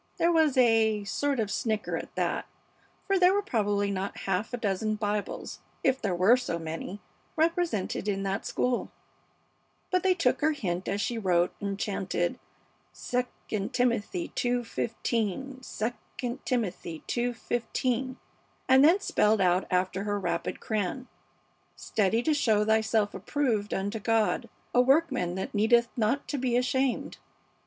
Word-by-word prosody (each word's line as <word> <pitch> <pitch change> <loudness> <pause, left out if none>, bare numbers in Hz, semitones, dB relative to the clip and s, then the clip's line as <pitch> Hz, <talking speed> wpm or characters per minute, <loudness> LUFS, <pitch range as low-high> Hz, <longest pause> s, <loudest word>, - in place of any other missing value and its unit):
There 340 - +3
was 315 -5 +3
a 225 -4 +4
sort 275 +7 -1
of 210 -2 -1
snicker 220 -2 -1
at - - -6
that, - - -1 0.6
for 390 -1 +2
there 365 +1 +5
were 410 - +1
probably 205 - 0
not 195 0 -4
half 195 +3 -1
a 245 - -2
dozen 215 -1 -1
Bibles, 210 -1 -3 0.2
if 265 0 +2
there 190 -3 0
were 195 +8 +5
so 245 -9 -3
many, 165 +4 -5 0.4
represented 320 - 0
in 195 -1 0
that 195 0 -2
school; 250 -1 -1 1.0
but 365 0 +3
they 370 0 +3
took 340 -3 +1
her 310 +1 +3
hint 185 -10 -3
as 200 +1 -1
she 235 +2 -1
wrote, 180 -3 +2
and 200 -1 -2
chanted, 190 -4 -1 0.7
"II 225 -4 -2
Timothy 235 -8 0
ii:15, 240 0 -2 0.3
II 245 0 -2
Timothy 190 -9 -2
ii:15," 245 +1 -1 0.5
and 265 +1 +6
then 335 +6 +6
spelled 215 - +2
out 180 0 +2
after 185 +1 0
her 205 -1 -1
rapid 195 - -2
crayon, 220 +4 -2 0.7
"Study 220 +3 0
to 310 - +2
show 220 -7 +2
thyself 220 -1 +2
approved 235 -8 -1
unto 200 +3 -2
God, 225 +2 +1 0.2
a 245 - +6
workman 265 - +2
that 190 - -4
needeth 230 +3 +4
not 245 +4 0
to 285 - -1
be 250 -2 +1
ashamed." 260 +1 0
225 Hz, 140 wpm, -28 LUFS, 200-255 Hz, 1.0 s, and